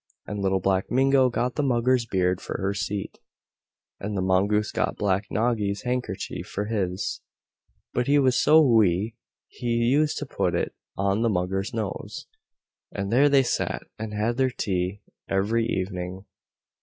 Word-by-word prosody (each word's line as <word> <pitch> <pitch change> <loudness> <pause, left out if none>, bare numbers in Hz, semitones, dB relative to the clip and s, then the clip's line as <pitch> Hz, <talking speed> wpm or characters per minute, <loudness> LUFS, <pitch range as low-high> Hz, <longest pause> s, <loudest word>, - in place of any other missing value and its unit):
And 105 - -5
Little 95 -1 +1
Black 95 0 0
Mingo 135 0 +4
got 125 +1 -1
the - - +2
Mugger's 125 -2 +2
beard 90 -2 +1
for - - -5
her 95 +1 0
seat, 100 0 -4 0.8
and 100 0 -4
the - - 0
Mongoose 100 +3 +2
got - - -1
Black 100 0 +1
Noggy's 105 -2 0
handkerchief 125 -6 -3
for 105 - -3
his. 95 -4 -2 0.7
But 125 - 0
he 145 +1 +4
was 130 -3 +3
so 155 +5 +6
wee 110 - +3 0.3
he 120 - -7
used 120 +6 +2
to - - -3
put - - -1
it - - -1 0.2
on 100 +2 +1
the 115 - +2
Mugger's 95 +1 -1
nose, 110 -4 -5 0.7
and 100 +2 -3
there 140 +4 +5
they 140 -1 +5
sat, 120 - -1 0.2
and 110 -1 -4
had 110 +3 -1
their 130 -1 +3
tea 95 -4 -2 0.3
every 110 +4 +1
evening. 95 -1 -3
105 Hz, 155 wpm, -25 LUFS, 95-125 Hz, 0.8 s, so